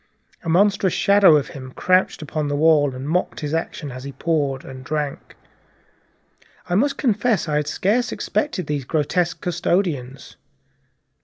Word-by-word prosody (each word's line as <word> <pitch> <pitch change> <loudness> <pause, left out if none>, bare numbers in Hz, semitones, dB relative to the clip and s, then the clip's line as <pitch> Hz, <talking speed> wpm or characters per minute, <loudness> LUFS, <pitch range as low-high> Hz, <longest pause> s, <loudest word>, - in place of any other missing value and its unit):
A 165 - -4
monstrous 195 +1 +3
shadow 200 -5 +5
of 145 -2 0
him 130 -1 -9
crouched 185 -3 +1
upon 150 0 -3
the 145 - -1
wall, 145 -3 +3
and 130 +2 -6
mocked 175 +2 -1
his 150 0 -3
action 160 -3 -3
as 130 +1 -8
he 140 - -6
poured 140 -4 -1
and 130 -1 -9
drank. 150 0 -4 1.3
I 175 - -3
must 275 +9 +2
confess 220 - +1
I 150 -1 0
had 150 -1 -1
scarcely 215 +10 0
expected 290 - -2
these 145 -2 -2
grotesque 165 +4 -1
custodians. 165 -7 -2
160 Hz, 150 wpm, -21 LUFS, 145-185 Hz, 1.3 s, shadow